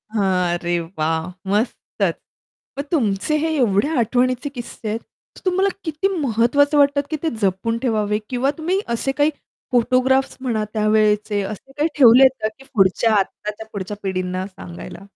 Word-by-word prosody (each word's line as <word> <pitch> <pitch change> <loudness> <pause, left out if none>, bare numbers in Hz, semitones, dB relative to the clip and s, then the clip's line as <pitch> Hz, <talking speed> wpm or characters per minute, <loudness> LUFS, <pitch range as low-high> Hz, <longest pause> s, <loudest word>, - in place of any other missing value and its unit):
हां 185 -4 +1
अरे 175 0 -1
वाह! 160 -1 -2 0.3
मस्तच 215 +4 -1 0.6
मग 280 - -2
तुमचे 230 - +1
हे 320 +2 0
एवढे 235 -1 +2
आठवणीचे 255 +4 +1
किस्से 240 -4 -8
आहेत 225 +2 -2 0.5
तुम्हाला 380 +2 +2
किती 320 +3 -1
महत्वाचं 285 +3 +2
वाटत, 285 0 +4
की 310 - -1
ते 320 - +2
जपून 195 +4 0
ठेवावे 215 -4 0
किंवा 260 +2 +1
तुम्ही 355 +5 0 0.2
असे 270 +3 -1
काही 295 +1 +4 0.4
फोटोग्राफ्स 255 +2 +2
म्हणा 225 -5 -1
त्यावेळेचे 215 -1 +2
असे 215 +7 -7
काही 305 +2 +2
ठेवले 255 0 +8
आहेत 265 0 +4
का - - +3
की 270 - -15
पुढच्या 200 +2 +3
आत्ताच्या 210 +2 -2
पुढच्या 200 +1 -5
पिढींना 185 -1 -2
सांगायला? 185 0 -10
225 Hz, 145 wpm, -21 LUFS, 200-270 Hz, 0.6 s, ठेवले